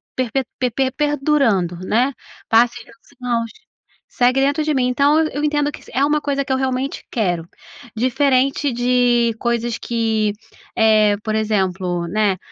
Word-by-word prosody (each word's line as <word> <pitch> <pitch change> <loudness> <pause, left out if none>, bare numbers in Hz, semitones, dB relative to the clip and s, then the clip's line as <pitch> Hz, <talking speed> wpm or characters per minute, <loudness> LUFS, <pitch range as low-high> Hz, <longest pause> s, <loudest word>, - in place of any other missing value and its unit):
perpe 255 +1 -1 0.2
perpe 260 +1 0
perdurando, 275 - +1
né? 245 +7 +2 0.4
Passe 235 +1 +4
os 230 +4 -21
anos, 230 -1 -1 0.6
segue 250 +2 +2
dentro 285 +3 +1
de 305 0 0
mim, 255 -3 +1
então, 280 +4 +3
eu 290 - -4
entendo 295 -1 +1
que - - -12
se - - -16
é 270 - +2
uma 300 +1 +2
coisa 280 -1 -1
que 265 - -5
eu - - +1
realmente 265 +1 -2
quero, 175 -7 -1 0.5
diferente 265 +3 +1
de 245 -1 +2
coisas 235 -1 -1
que, 220 -3 -1 0.4
eh, 215 -2 +4
por 215 -1 -2
exemplo, 190 -5 -1
né, 200 +1 +1
245 Hz, 150 wpm, -19 LUFS, 220-275 Hz, 0.6 s, Passe